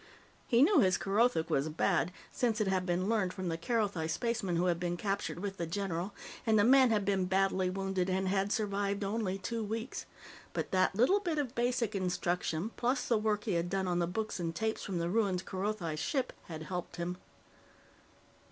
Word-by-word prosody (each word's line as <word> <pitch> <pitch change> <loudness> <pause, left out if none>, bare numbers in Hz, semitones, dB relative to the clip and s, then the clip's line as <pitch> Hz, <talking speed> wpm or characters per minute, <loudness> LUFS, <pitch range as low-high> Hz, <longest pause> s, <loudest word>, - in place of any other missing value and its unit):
He 240 +1 +5
knew 380 +6 +5
his 185 -2 +4
Kerothic 200 -3 +2
was 140 +3 +1
bad, 165 +2 +1 0.2
since 230 -3 0
it 215 - +1
had 190 -1 0
been 180 +2 0
learned 210 -5 +1
from 185 -3 -3
the 165 - -1
Kerothi 200 -5 0
spaceman 200 -2 -1
who 175 +2 +2
had 175 -2 +1
been 175 0 -1
captured 200 0 -2
with 195 +1 -4
the 170 - -2
general, 185 +1 -3 0.3
and 220 -2 +3
the 205 - +5
man 260 +2 +6
had 210 -3 +1
been 195 -2 +1
badly 190 0 +2
wounded 190 -1 -1
and 190 +1 0
had 195 +1 +1
survived 200 -2 0
only 200 -1 -1
two 225 +3 -3
weeks. 225 +4 -4 0.5
But - - -3
that 185 0 +2
little 260 - +4
bit 345 -6 -2
of 270 -4 -1
basic 240 -2 0
instruction, 180 0 -1
plus 250 +1 0
the 230 -3 +3
work 210 -1 0
he 215 - -1
had 170 +1 0
done 190 0 -1
on 175 -1 +1
the 170 - +1
books 215 +2 -3
and 165 -1 -2
tapes 220 +2 -1
from 190 -3 -3
the 170 0 0
ruined 190 -2 +1
Kerothi 190 -4 -2
ship, 270 - -1
had 160 -2 -7
helped 180 +2 -5
him. 175 +1 -3
195 Hz, 200 wpm, -32 LUFS, 180-220 Hz, 0.5 s, man